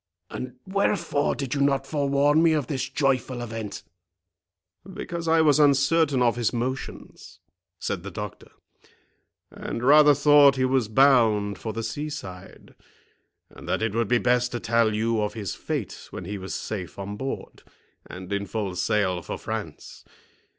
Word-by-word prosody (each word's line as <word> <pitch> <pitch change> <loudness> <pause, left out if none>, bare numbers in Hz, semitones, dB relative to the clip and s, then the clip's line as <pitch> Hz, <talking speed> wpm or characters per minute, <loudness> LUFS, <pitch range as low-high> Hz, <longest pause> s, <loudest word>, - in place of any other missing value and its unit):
and 125 0 -6
wherefore 190 -6 0
did 135 -3 -4
you 140 - -1
not 135 -1 +2
forewarn 145 +1 +2
me 165 -1 +4
of 150 -4 0
this 130 0 -3
joyful 130 -3 0
event?" 115 -3 -6 1.1
"Because 170 -1 -6
I 160 0 +4
was 150 -1 +4
uncertain 145 -1 +3
of 120 0 +2
his 120 -2 0
motions," 130 +2 -6 0.4
said 95 +1 -3
the 100 - -7
doctor, 105 +1 -8 1.0
"and 115 - -6
rather 145 +2 +7
thought 145 -1 +6
he 130 -1 +1
was 130 -3 +1
bound 110 -6 +3
for 110 - -4
the 115 +1 -5
sea 145 +7 -4
side, 95 -12 -10 0.8
and 85 - -12
that 95 +4 0
it 110 -2 -1
would 115 -1 0
be 120 - +3
best 125 0 +1
to 120 - -2
tell 115 -2 +1
you 110 0 0
of 105 +1 -2
his 100 -5 -4
fate - - -5
when 90 - -8
he 100 +2 -5
was 95 +1 -6
safe 95 -5 -5
on 100 +1 -5
board, 135 +5 -6 0.5
and 95 +2 -7
in 100 0 -2
full 100 -4 -3
sail 90 0 0
for - - -6
France. - - -7
120 Hz, 160 wpm, -25 LUFS, 105-140 Hz, 1.1 s, rather